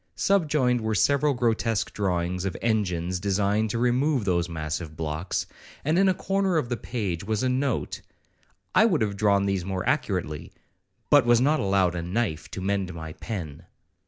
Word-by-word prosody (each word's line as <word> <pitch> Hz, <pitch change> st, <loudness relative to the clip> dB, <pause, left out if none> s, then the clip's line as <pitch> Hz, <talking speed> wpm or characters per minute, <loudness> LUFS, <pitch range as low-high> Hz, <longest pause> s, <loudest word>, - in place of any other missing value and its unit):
Subjoined 150 Hz, -10 st, +2 dB
were 110 Hz, 0 st, -1 dB
several 140 Hz, +8 st, +3 dB
grotesque 115 Hz, -4 st, 0 dB
drawings 90 Hz, -2 st, -1 dB
of 95 Hz, -2 st, -3 dB
engines 90 Hz, -6 st, 0 dB
designed 100 Hz, +3 st, +1 dB
to 115 Hz, -, -2 dB
remove 125 Hz, +1 st, +1 dB
those 85 Hz, -2 st, +1 dB
massive 80 Hz, 0 st, -4 dB
blocks, 80 Hz, +3 st, -2 dB, 0.4 s
and 160 Hz, +5 st, +2 dB
in 195 Hz, 0 st, +5 dB
a -, -, +3 dB
corner 195 Hz, -2 st, 0 dB
of 130 Hz, -6 st, -1 dB
the 120 Hz, -, 0 dB
page 100 Hz, -7 st, -3 dB
was 110 Hz, +3 st, -1 dB
a 130 Hz, -, +2 dB
note,—'I 135 Hz, +9 st, -2 dB
would 175 Hz, -, +2 dB
have 100 Hz, -2 st, -2 dB
drawn 100 Hz, -1 st, +2 dB
these 100 Hz, -2 st, 0 dB
more 95 Hz, +2 st, -3 dB
accurately, 95 Hz, -, -1 dB, 0.6 s
but 145 Hz, -5 st, +6 dB
was 120 Hz, -1 st, +5 dB
not 150 Hz, +5 st, +3 dB
allowed 95 Hz, -3 st, +2 dB
a 85 Hz, -, -3 dB
knife 90 Hz, -1 st, -2 dB
to -, -, -6 dB
mend 95 Hz, -2 st, -1 dB
my 80 Hz, -1 st, -7 dB
pen.' 85 Hz, -8 st, -6 dB
100 Hz, 165 wpm, -26 LUFS, 90-125 Hz, 0.6 s, but